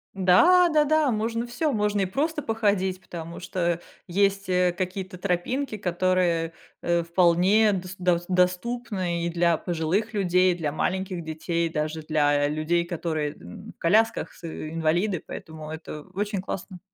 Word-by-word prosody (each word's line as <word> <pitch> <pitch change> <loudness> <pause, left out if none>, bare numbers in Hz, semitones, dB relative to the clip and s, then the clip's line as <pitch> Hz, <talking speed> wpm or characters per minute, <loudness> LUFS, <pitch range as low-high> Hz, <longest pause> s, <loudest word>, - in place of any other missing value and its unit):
Да, 340 - +6
да, 305 -2 +3
да, 310 -2 +3
можно 230 +1 -1
всё, 245 +6 -1
можно 210 -3 +1
и - - +2
просто 300 - -1
походить, 200 -6 0
потому 170 -2 -8
что 175 -2 -1 0.3
есть, 195 +1 +1
э, 180 -1 +3
какие-то 185 0 -4
тропинки, 215 +7 -1
которые, 180 -3 +1 0.3
э, 170 0 +1
вполне 180 +5 +4
дос 185 -1 -5
дос 175 -1 +1
доступны 180 -1 0
и - - 0
для 170 0 +2
пожилых 175 +7 -1
людей, 180 -2 +3
для 160 -4 -2
маленьких 185 +2 -2
детей, 165 +1 -2
даже 155 0 -3
для 145 -2 +2
людей, 155 +3 0
которые, 160 -3 -2
м, 90 +1 -11
в - - -55
колясках, 220 +7 +2
с - - -19
и-инвалиды, 165 +4 -1
поэтому 155 -1 -8
это 155 -1 -7
очень 205 -1 -1
классно. 185 -1 -6
180 Hz, 145 wpm, -25 LUFS, 170-205 Hz, 0.3 s, Да